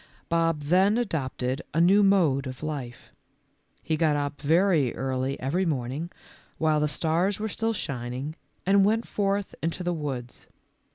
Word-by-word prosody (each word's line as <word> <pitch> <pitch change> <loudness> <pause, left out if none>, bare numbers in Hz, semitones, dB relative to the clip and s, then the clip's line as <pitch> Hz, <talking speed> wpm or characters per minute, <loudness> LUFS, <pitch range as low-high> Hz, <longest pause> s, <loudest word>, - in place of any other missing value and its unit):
Bob 165 -2 +1
then 185 +8 +3
adopted 135 - -2
a - - +3
new 190 +5 +6
mode 165 -9 +3
of 130 +2 -8
life. 140 -6 -6 0.7
He 160 - 0
got 155 -2 +2
up 145 0 -3
very 160 -3 +3
early 130 +1 -2
every 150 +9 0
morning, 145 +1 -2 0.5
while 155 -1 +2
the 150 - +2
stars 170 +6 0
were 220 - -1
still 225 +1 -1
shining, 130 - -4 0.3
and 195 +1 +5
went 220 +3 +1
forth 200 -1 -1
into 165 +2 -2
the 175 0 0
woods. 135 -6 -5
160 Hz, 150 wpm, -26 LUFS, 135-190 Hz, 0.7 s, new